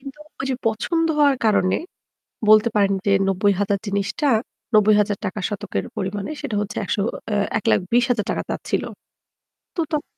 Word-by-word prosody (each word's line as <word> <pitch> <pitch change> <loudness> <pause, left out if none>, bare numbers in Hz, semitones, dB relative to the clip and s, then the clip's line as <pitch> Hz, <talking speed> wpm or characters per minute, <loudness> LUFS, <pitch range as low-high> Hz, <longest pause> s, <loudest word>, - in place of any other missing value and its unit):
কিন্তু 275 +2 -10 0.2
ঐযে 265 -1 -1
পছন্দ 330 +10 0
হওয়ার 285 -2 +5
কারণে 185 -3 +3 0.7
বলতে 215 +2 +7
পারেন 200 -1 +3
যে 200 - +4 0.2
৯০,০০০ 200 +1 +1
জিনিসটা 200 +8 -1 0.5
৳৯০,০০০ 210 -1 +3
শতকের 205 0 -3
পরিমাণে 200 +3 -3
সেটা 240 -8 -3
হচ্ছে 210 0 -5
১০০ 200 - -1 0.3
আ - - +2 0.2
৳১,২০,০০০ 230 +2 +1
চাচ্ছিল। - - -2 0.9
তো 340 - 0
তখন 300 0 -3
210 Hz, 125 wpm, -22 LUFS, 200-245 Hz, 0.9 s, বলতে